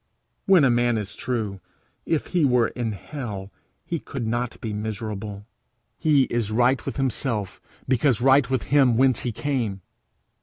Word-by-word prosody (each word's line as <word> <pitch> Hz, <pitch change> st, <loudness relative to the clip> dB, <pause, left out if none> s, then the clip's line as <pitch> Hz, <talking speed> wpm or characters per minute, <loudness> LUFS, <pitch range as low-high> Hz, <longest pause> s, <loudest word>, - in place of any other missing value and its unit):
When 190 Hz, -5 st, +6 dB
a 130 Hz, -, +5 dB
man 120 Hz, -1 st, +2 dB
is 105 Hz, -1 st, -4 dB
true, 110 Hz, -6 st, -3 dB, 0.5 s
if 160 Hz, -3 st, 0 dB
he 175 Hz, -3 st, +3 dB
were 125 Hz, -4 st, +3 dB
in 115 Hz, -3 st, -3 dB
hell 100 Hz, -, -7 dB, 0.3 s
he 170 Hz, -1 st, -2 dB
could 130 Hz, -5 st, -5 dB
not 120 Hz, +1 st, -2 dB
be 110 Hz, -2 st, -4 dB
miserable. 105 Hz, -1 st, -5 dB, 0.5 s
He 150 Hz, -4 st, +4 dB
is 120 Hz, -4 st, -1 dB
right 120 Hz, +3 st, +2 dB
with -, -, -3 dB
himself 125 Hz, -6 st, -2 dB, 0.3 s
because 130 Hz, -2 st, +2 dB
right 135 Hz, +1 st, +4 dB
with 130 Hz, -1 st, 0 dB
him 130 Hz, -5 st, +5 dB
whence 130 Hz, -2 st, +4 dB
he 120 Hz, -, -2 dB
came. 115 Hz, -7 st, -2 dB
120 Hz, 155 wpm, -24 LUFS, 110-135 Hz, 0.5 s, When